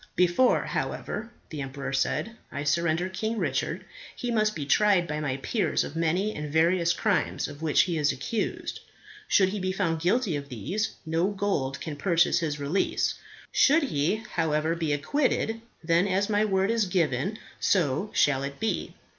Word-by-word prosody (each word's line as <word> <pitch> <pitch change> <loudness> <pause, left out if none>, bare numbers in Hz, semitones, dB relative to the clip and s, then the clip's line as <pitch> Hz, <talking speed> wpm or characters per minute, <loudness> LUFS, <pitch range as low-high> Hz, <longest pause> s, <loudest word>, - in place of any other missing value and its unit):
"Before, 180 +8 +3
however," 215 +3 -3 0.2
the 150 -2 -4
emperor 135 0 -5
said, 215 - 0 0.2
"I 140 - -4
surrender 170 +3 +1
King 220 +4 -3
Richard, - - -1 0.3
he 245 -2 -3
must 215 -2 +1
be 145 - -4
tried 195 +2 +3
by 150 -1 -3
my 140 -3 -2
peers 180 - 0
of 145 - -7
many 175 +6 +1
and 150 -1 -5
various 170 +2 +3
crimes 200 +3 0
of 145 +1 -10
which 160 -2 +4
he 170 -3 0
is 145 -1 +3
accused. 215 - -3 0.5
Should 190 - +4
he 205 +2 -3
be 185 0 -1
found 170 -4 -1
guilty 185 0 +1
of 140 -1 -5
these, 175 - -3
no 165 +3 +1
gold 195 -10 -1
can 155 -3 -6
purchase 170 +2 +3
his 150 -3 -2
release. 145 +7 0 0.4
Should 305 +3 +5
he, 155 - +1 0.2
however, 160 -1 +1
be 165 -3 -1
acquitted, 225 - 0 0.2
then 170 +4 +3
as 200 +2 0
my 210 +1 +3
word 195 0 +1
is 230 -3 +1
given 175 - 0 0.2
so 175 +1 +1
shall 135 -2 +3
it 140 0 -5
be." 220 - -2
170 Hz, 170 wpm, -27 LUFS, 150-205 Hz, 0.5 s, Should